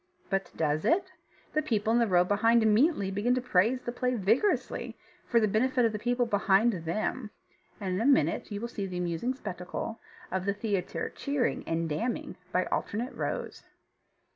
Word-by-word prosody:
But 195 -2 0
does 155 -1 0
it? 370 +2 +2 0.4
The 310 - +2
people 225 -6 0
in 240 - +4
the 235 - +3
row 180 -2 +4
behind 225 +5 +3
immediately 220 - +3
begin 215 +6 +1
to - - +1
praise 245 +1 +2
the 240 - -3
play 250 +1 -1
vigorously, 225 - 0 0.3
for 235 - +4
the 215 - +3
benefit 245 +5 +2
of 225 - +2
the 210 - -4
people 245 +2 +1
behind 205 +1 +3
them; 205 +7 -2 0.5
and 190 -3 -2
in 185 - -1
a - - 0
minute 215 - +2
you 210 +3 -3
see 205 -4 -4
the 180 -1 -5
amusing 180 +9 -1
spectacle 205 0 -5 0.3
of 190 0 -1
the 200 0 0
theatre 205 -4 -2
cheering 280 -3 -1
and 165 0 0
damning 225 +11 -2 0.2
by 185 0 +1
alternate 235 +5 -2
rows. - - -4
215 Hz, 175 wpm, -29 LUFS, 190-245 Hz, 0.5 s, in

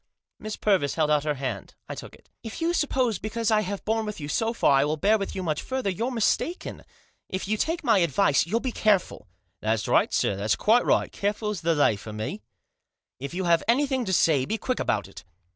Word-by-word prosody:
Miss 215 0 -5
Purvis 185 -10 +1
held 155 -2 +1
out 150 0 +2
her 150 -1 0
hand. 130 -8 -5
I - - -5
took - - -9
it. - - -24
" - - -56
If 225 - -7
you 335 +1 0
suppose 260 - 0
because 225 +1 -2
I 215 -1 +4
have 200 0 -5
borne 220 0 0
with 210 - -5
you 145 - -5
so 225 +9 0
far 230 -11 +3
I - - +4
will 150 +2 -1
bear 210 +6 +3
with 195 - -4
you 190 - -3
much 155 -4 -1
further, 260 -6 -2
you're 225 +7 -2
mistaken. 260 - -1 0.5
If 185 +1 -4
you 215 - +1
take 330 +10 -2
my 225 -4 +4
advice, 170 -2 +2
you'll 225 +6 0
be 260 - -2
careful." 200 - 0 0.2
" 90 +2 -48
That's 110 0 0
right, - - +3
sir; 100 - +1
that's 105 +2 0
quite 235 +3 +3
right. - - +2
Careful's 210 -1 -2
the 165 0 +1
lay 145 -8 +3
for 110 +1 -9
me." 110 - -5 0.4
" - - -60
If 140 +5 -6
you 190 - -2
have 170 -2 +3
anything 265 +1 +2
to 190 - -2
say, 155 -5 +3
be 220 - -2
quick 255 +3 -2
about 105 -4 -1
it." 100 - -12
195 Hz, 235 wpm, -26 LUFS, 145-225 Hz, 0.5 s, I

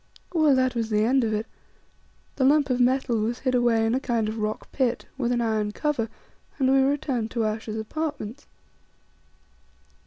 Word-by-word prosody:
Well, 310 -5 +4
that 255 -1 +2
was 230 -2 -2
the 210 -1 +2
end 255 +3 +3
of 220 - 0
it. 215 +1 -1 0.9
The 270 - +1
lump 280 0 +4
of 250 - +1
metal 250 -1 +2
was 225 +3 -1
hid 255 -1 0
away 240 -2 +3
in 225 - +1
a 260 - +2
kind 235 -5 -1
of 220 +1 -4
rock 215 0 -3
pit, 255 -4 0
with 245 -3 -1
an 240 -1 +1
iron 215 -2 0
cover, 275 -6 -1 0.5
and 265 -2 +2
we 270 - +5
returned 265 -4 0
to 230 -2 -1
Ayesha's 215 0 -3
apartments. 285 +1 -5
240 Hz, 180 wpm, -25 LUFS, 220-270 Hz, 0.9 s, we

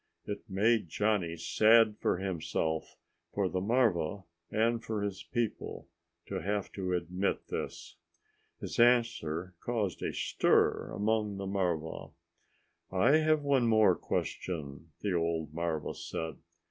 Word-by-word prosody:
It 105 - -4
made 105 0 +2
Johnny 95 -3 0
sad 110 +5 +5
for - - +1
himself, 80 -3 -2 0.4
for 100 -2 +2
the 90 0 -2
marva, 100 -5 +1 0.3
and 115 +2 +1
for 110 -2 -2
his 100 -2 -3
people, 120 -3 -3 0.4
to - - -4
have 100 +3 -2
to 95 -2 -3
admit 90 +2 -1
this. - - -5 0.6
His - - -5
answer 105 -8 +2
caused 110 -6 -2
a - - -1
stir - - +2
among 105 -1 0
the 100 - -4
marva. 90 -5 -2 0.8
"I 115 +11 +5
have 155 -1 +2
one 135 -4 +3
more 110 -1 +5
question," 80 -3 -4
the 100 -3 0
old 80 -3 -1
marva 85 -2 -2
said. 80 -3 -5
100 Hz, 125 wpm, -31 LUFS, 85-110 Hz, 0.8 s, sad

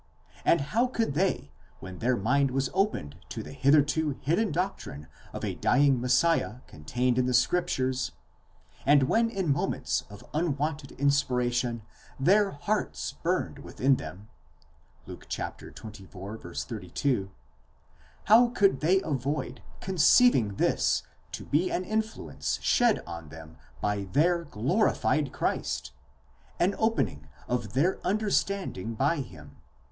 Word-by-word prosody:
and 170 - +4
how 235 +3 +3
could 225 - -1
they, 165 - 0 0.3
when 95 -1 -9
their 125 +1 +1
mind 135 +7 +2
was 135 0 -1
opened 190 - 0
to - - -5
the - - -9
hitherto 145 +2 +2
hidden 170 +9 +1
doctrine 160 - -3 0.3
of - - -5
a - - -2
dying 140 -3 +3
Messiah 125 -1 +2
contained 125 +11 -1
in 125 - +2
the 125 - +2
scriptures, 130 -8 +1 0.7
and 145 0 +5
when 230 - +2
in 190 -9 0
moments 140 - -1
of 105 0 -12
unwonted 150 -2 -1
inspir 140 -3 +2
ation 120 -2 -1 0.4
their 195 +8 +4
hearts 200 +8 -2
burned - - -1
within 135 +1 +1
them 100 +4 -9 0.8
(Luke - - -11
xxiy. - - -5
32),—how 100 - -2
could 205 -5 +2
they 185 +5 +3
avoid 140 0 -3 0.2
conceiving 180 - +4
this - - +1 0.3
to - - -6
be 165 +6 +1
an 180 - -1
influence 220 +2 -2
shed 240 -3 +3
on 85 -3 -8
them 80 +1 -11 0.3
by 105 -1 -1
their 170 - +2
glorified 150 - +1
Christ, - - -2 0.7
an 185 +3 +3
opening 150 - 0 0.2
of 120 -4 -2
their 160 +9 +2
understanding 200 - -1
by 145 +8 +1
him 85 - -8
(v. 70 - -20
140 Hz, 125 wpm, -28 LUFS, 115-180 Hz, 0.8 s, and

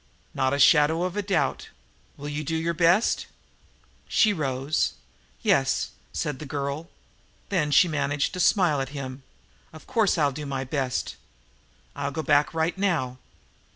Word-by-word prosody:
"Not 130 0 +1
a 140 - 0
shadow 150 +3 +5
of 185 +1 -2
a 205 - 0
doubt. 195 -2 -1 0.5
Will 145 - -7
you 150 +1 -3
do 160 +3 -2
your 165 +1 0
best?" 175 +6 +2 0.8
She 215 -1 +3
rose. 140 -2 -1 0.5
"Yes," - - +2 0.2
said 145 -4 -3
the 155 - -7
girl. 140 +4 -4 0.6
Then 170 -7 +1
she 145 +5 +5
managed 145 -2 -1
to 180 - -5
smile 175 -5 +3
at 135 - -4
him. 130 0 -6 0.5
"Of 160 - -13
course 225 -7 +2
I'll 145 -3 +2
do 145 +2 -6
my 135 -1 -2
best. 135 -1 -2 0.8
I'll 140 0 -2
go 155 +3 -4
back 145 -1 +3
right 165 +1 0
now." 160 -11 -1
150 Hz, 155 wpm, -25 LUFS, 140-170 Hz, 0.8 s, shadow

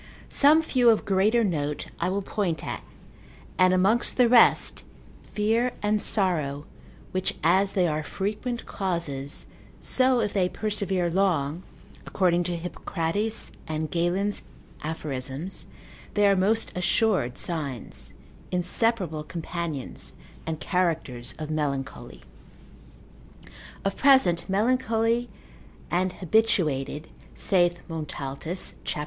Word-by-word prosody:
Some 305 +3 +5
few 250 -6 +4
of 220 - +3
greater 205 +5 +3
note 150 -6 -1
I - - 0
will 195 +1 -1
point 180 -7 -2
at; - - -4 0.8
and 185 0 +6
amongst 195 +6 +2
the 250 -2 +6
rest, 235 0 +5 0.4
fear 225 +4 0
and 210 0 +2
sorrow, 155 -9 +1 0.5
which 185 0 -1
as 190 +4 +3
they 180 -3 +3
are 155 -1 -1
frequent 210 +8 -3
causes, 165 -8 -3 0.3
so 255 -1 +3
if 210 -3 -1
they 185 -3 +2
persevere 195 -5 -1
long, 170 -4 +1 0.4
according 175 -2 +1
to 175 0 -1
Hippocrates 180 +5 -2 0.2
and 155 -1 -3
Galen's 180 +4 0 0.4
aphorisms, 150 +1 -5 0.5
they 205 -1 +4
are 200 -1 +5
most 210 +4 +2
assured 180 - +1
signs, 145 -8 -4 0.3
inseparable 180 -2 0
companions, 165 -3 -5 0.3
and 160 -1 -2
characters 160 -10 -1
of 155 -1 -5
melancholy; 140 -3 -3 1.6
of 195 - 0
present 235 -12 +4
melancholy 230 +2 +1 0.6
and 180 +1 +1
habituated, 160 -7 +1 0.3
saith 175 -2 +2
Montaltus 155 +1 -4
cap. - - -3
180 Hz, 105 wpm, -26 LUFS, 155-210 Hz, 1.6 s, and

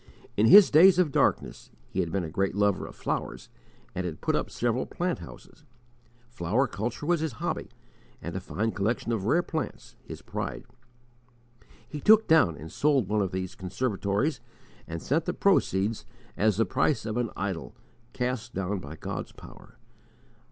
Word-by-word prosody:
In 105 +2 +4
his 200 - +9
days 175 +4 +7
of 180 -5 +3
darkness - - 0 0.2
he - - -4
had 85 - 0
been 95 +1 -1
a 80 - -5
great 95 +2 -1
lover 100 -1 +1
of - - -12
flowers - - -4 0.4
and 90 - -3
had 85 -4 -5
put - - 0
up - - -1
several 120 +1 -1
plant 180 0 -2
houses; 150 - -13 0.6
flower 115 +3 0
culture 115 +3 -4
was 175 +1 +2
his 155 -4 -2
hobby, 110 - -4 0.5
and - - -6
a - - -1
fine 110 +3 -2
collection 110 +4 -1
of 105 -4 -1
rare 170 +10 +3
plants, 160 -2 -5
his - - -10
pride. - - -5 1.2
He 145 +3 -7
took 220 +1 +6
down 155 - +4
and 80 +1 -9
sold 140 -9 +2
one 105 0 +1
of 95 -2 -1
these 95 -1 -4
conservatories 100 - -1 0.5
and 85 0 -6
sent 155 +4 0
the 180 - -2
proceeds 110 - +1 0.3
as 105 -1 +2
"the 115 - +3
price 120 +7 0
of 110 -1 -3
an 120 -2 0
idol, 95 -4 -4 0.4
cast 125 -1 -3
down 95 +1 -2
by 80 -2 -9
God's - - -6
power." - - -15
110 Hz, 170 wpm, -27 LUFS, 95-145 Hz, 1.2 s, his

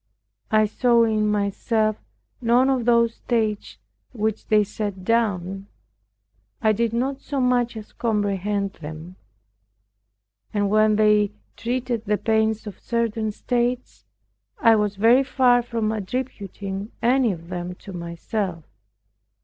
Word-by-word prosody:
I 215 -1 +4
saw 235 +2 +3
in 215 -2 +1
myself 210 +1 0 0.5
none 245 +3 +4
of 255 -3 0
those 235 -1 +4
states 220 -4 -1 0.4
which 220 -2 -2
they 215 -1 +4
set 205 -2 -5
down. 195 -4 0 0.9
I 220 -2 +3
did 230 +1 0
not 265 +4 -1
so 280 0 -3
much 245 -2 +1
as 215 - -10
comprehend 205 -3 -1
them. 160 +4 -8 1.4
And 205 -1 +1
when 215 0 +4
they 210 -1 +3 0.2
treated 240 -1 -2
the 210 0 +1
pains 220 0 +1
of 210 - -8
certain 225 -2 -1
states, 245 +3 -2 0.5
I 230 - +5
was 210 -1 0
very 230 +6 +5
far 250 -2 +3
from 230 -2 -2
attributing 205 -2 -5
any 245 -1 +3
of 170 -2 -8
them 180 0 -5
to 195 - -8
myself. 170 +1 -4
215 Hz, 125 wpm, -23 LUFS, 200-235 Hz, 1.4 s, I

